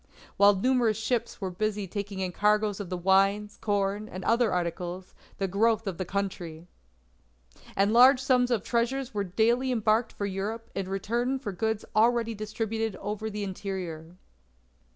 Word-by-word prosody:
While 200 Hz, 0 st, +6 dB
numerous 235 Hz, 0 st, +2 dB
ships 235 Hz, +1 st, -2 dB
were 190 Hz, -2 st, -3 dB
busy 210 Hz, +2 st, -2 dB
taking 200 Hz, +1 st, -5 dB
in 185 Hz, -1 st, -1 dB
cargoes 210 Hz, +1 st, +1 dB
of 200 Hz, -4 st, -5 dB
the 180 Hz, -, -3 dB
wines, 195 Hz, +3 st, +2 dB
corn, 205 Hz, +1 st, -1 dB
and 185 Hz, 0 st, -7 dB
other 230 Hz, -1 st, +3 dB
articles, 180 Hz, +1 st, -3 dB, 0.2 s
the 195 Hz, -, -1 dB
growth 220 Hz, +4 st, +2 dB
of 195 Hz, -3 st, -4 dB
the 185 Hz, -, -1 dB
country. 175 Hz, -4 st, -4 dB, 1.1 s
"And 200 Hz, +2 st, +2 dB
large 255 Hz, +2 st, +7 dB
sums 255 Hz, -2 st, +2 dB
of 230 Hz, -5 st, 0 dB
treasures 250 Hz, +2 st, -1 dB
were 205 Hz, -1 st, -1 dB
daily 230 Hz, +7 st, +1 dB
embarked 225 Hz, 0 st, +1 dB
for 200 Hz, -, -3 dB
Europe, 205 Hz, +4 st, -4 dB
in 190 Hz, -1 st, -3 dB
return 235 Hz, +7 st, -1 dB
for 250 Hz, -6 st, -5 dB
goods 220 Hz, +3 st, -2 dB
already 230 Hz, +1 st, +3 dB
distributed 220 Hz, 0 st, -3 dB
over 210 Hz, +2 st, -4 dB
the 210 Hz, -1 st, -4 dB
interior. 185 Hz, -4 st, -5 dB
210 Hz, 155 wpm, -28 LUFS, 195-230 Hz, 1.1 s, large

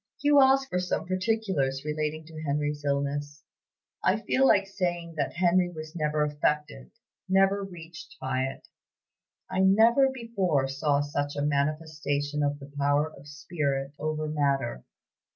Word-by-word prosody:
"You 290 Hz, -1 st, +6 dB
ask 270 Hz, 0 st, +4 dB
for 180 Hz, -, -1 dB
some 180 Hz, -2 st, -2 dB
particulars 185 Hz, -8 st, -1 dB
relating 155 Hz, +1 st, -2 dB
to 155 Hz, -1 st, -9 dB
Henry's 145 Hz, 0 st, -2 dB
illness. 145 Hz, +1 st, -2 dB, 0.6 s
I -, -, +3 dB
feel 270 Hz, +1 st, +2 dB
like 200 Hz, -5 st, +4 dB
saying 175 Hz, -4 st, -3 dB
that 145 Hz, -2 st, -1 dB
Henry 175 Hz, +1 st, +3 dB
was 155 Hz, -2 st, -9 dB
never 150 Hz, -2 st, 0 dB
affected, 145 Hz, -, -1 dB, 0.4 s
never 195 Hz, +1 st, +3 dB
reached 170 Hz, -4 st, -10 dB
by 130 Hz, 0 st, -1 dB
it. 135 Hz, -, -7 dB, 0.8 s
I -, -, -3 dB
never 225 Hz, +8 st, +5 dB
before 195 Hz, -, 0 dB
saw 140 Hz, +1 st, +1 dB
such 145 Hz, 0 st, -2 dB
a 145 Hz, 0 st, -1 dB
manifestation 150 Hz, 0 st, -1 dB
of 145 Hz, 0 st, 0 dB
the 140 Hz, 0 st, -12 dB
power 145 Hz, +2 st, +1 dB
of 140 Hz, +1 st, -14 dB
spirit 145 Hz, -2 st, -3 dB
over 155 Hz, 0 st, -2 dB
matter. 140 Hz, -, 0 dB
150 Hz, 140 wpm, -27 LUFS, 145-180 Hz, 0.8 s, You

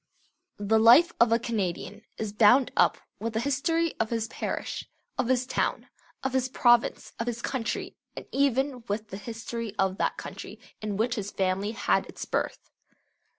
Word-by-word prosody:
The 205 Hz, +2 st, +2 dB
life 245 Hz, +10 st, +7 dB
of 235 Hz, -1 st, +5 dB
a 230 Hz, -, +5 dB
Canadian 205 Hz, -3 st, -3 dB, 0.2 s
is 215 Hz, -2 st, -4 dB
bound 230 Hz, +5 st, +5 dB
up -, -, +4 dB, 0.2 s
with 230 Hz, 0 st, -3 dB
the 220 Hz, -, 0 dB
history 320 Hz, +6 st, 0 dB
of 225 Hz, -, 0 dB
his 225 Hz, -1 st, -1 dB
parish, -, -, -4 dB, 0.3 s
of -, -, -1 dB
his 255 Hz, 0 st, +2 dB
town, 255 Hz, -, -1 dB, 0.3 s
of 265 Hz, -1 st, -1 dB
his 260 Hz, -1 st, +1 dB
province, 240 Hz, -2 st, +3 dB
of 230 Hz, -, -2 dB
his 240 Hz, 0 st, -3 dB
country, 250 Hz, -4 st, -3 dB, 0.2 s
and -, -, -6 dB
even 270 Hz, -2 st, +1 dB
with 210 Hz, +1 st, -3 dB
the 190 Hz, -, -6 dB
history 225 Hz, 0 st, -6 dB
of 190 Hz, -1 st, 0 dB
that -, -, 0 dB
country -, -, -8 dB, 0.2 s
in 210 Hz, -2 st, -3 dB
which 230 Hz, +3 st, +1 dB
his 205 Hz, -1 st, -3 dB
family 195 Hz, +3 st, -1 dB
had -, -, +1 dB
its -, -, -7 dB
birth. -, -, -3 dB
230 Hz, 170 wpm, -27 LUFS, 210-255 Hz, 0.3 s, life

